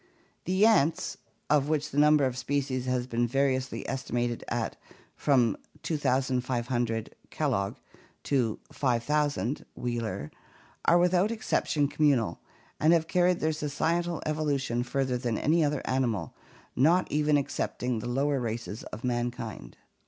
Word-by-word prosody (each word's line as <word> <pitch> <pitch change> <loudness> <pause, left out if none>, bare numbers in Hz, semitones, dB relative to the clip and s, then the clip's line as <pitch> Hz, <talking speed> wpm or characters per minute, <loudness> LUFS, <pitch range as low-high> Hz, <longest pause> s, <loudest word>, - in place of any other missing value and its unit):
The 185 +4 +3
ants, 165 -8 +3 0.3
of 145 -1 +2
which 150 -1 0
the 145 - 0
number 150 -1 +5
of 130 -2 -1
species 130 0 -2
has 125 -1 0
been 120 -1 0
variously 130 0 0
estimated 120 -2 -2
at - - -2 0.4
from 125 -7 +3 0.3
2500 125 -5 0 0.2
(Kellogg) 100 0 -1 0.5
to 125 -6 +1
5000 140 +1 0
(Wheeler), 115 -11 -3 0.5
are 170 - +6
without 180 +3 +3
exception 160 -9 0
communal, 140 -6 +1 0.4
and 155 +2 +5
have 165 -1 +2
carried 180 +1 +2
their 155 0 +1
societal 165 +3 -1
evolution 145 -6 0
further 130 0 -1
than 120 -3 -1
any 160 +2 +3
other 150 -1 0
animal, 115 - -1 0.4
not 170 +8 +4
even 150 0 +3
excepting 125 -3 -2
the 115 - -5
lower 140 +2 +1
races 115 -3 -4
of 110 - -8
mankind. 120 - -3
135 Hz, 125 wpm, -28 LUFS, 120-150 Hz, 0.5 s, are